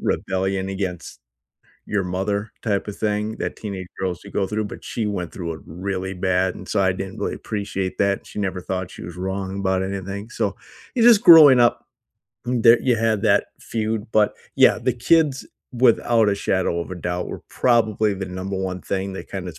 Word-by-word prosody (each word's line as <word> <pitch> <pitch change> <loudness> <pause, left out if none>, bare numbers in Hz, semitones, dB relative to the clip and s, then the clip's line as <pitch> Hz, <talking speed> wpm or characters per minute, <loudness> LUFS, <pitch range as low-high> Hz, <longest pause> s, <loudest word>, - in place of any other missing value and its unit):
rebellion 95 0 -1
against 95 -3 -5 0.7
your 100 -3 -1
mother 100 +3 -2
type 100 -3 -1
of 105 - -6
thing 105 +1 -1
that - - -3
teenage 95 -4 -6
girls 90 -2 -2
should - - -13
go 100 - +1
through, 110 +2 -2
but - - -10
she 110 -3 -3
went 90 -4 -3
through 85 -3 -4
it - - -11
really 95 +2 -4
bad, 95 0 0
and 95 - -11
so, 100 - +1
I 95 -1 +3
didn't 95 +3 -6
really - - -2
appreciate 100 -3 -4
that, 100 0 +2
and - - -25
she - - -9
never 95 -3 -2
thought 95 0 -4
she - - -11
was 85 +1 -8
wrong 95 +1 -4
about 95 -1 +1
anything. 100 +2 -5
So, 100 - -1 0.4
you 245 - +1
just 230 -2 +7
growing 150 -6 +10
up 120 - +2 0.6
there 120 -1 +5
you 125 -3 +2
had 110 -2 +1
that - - +3
feud, 110 -1 -3
but, 105 -1 +3 0.2
yeah, - - +5
the - - 0
kids, 145 +2 +2 0.3
without 120 -2 +3
a - - +1
shadow 95 -3 0
of 85 - -6
a - - -4
doubt, 90 0 -3
were - - -7
probably 110 -4 +2
the 95 0 -4
number 95 +2 -5
1 95 -1 -3
thing 95 0 -3
that 95 - -8
kind 95 -2 -5
of 80 - -9
100 Hz, 200 wpm, -22 LUFS, 95-110 Hz, 0.7 s, growing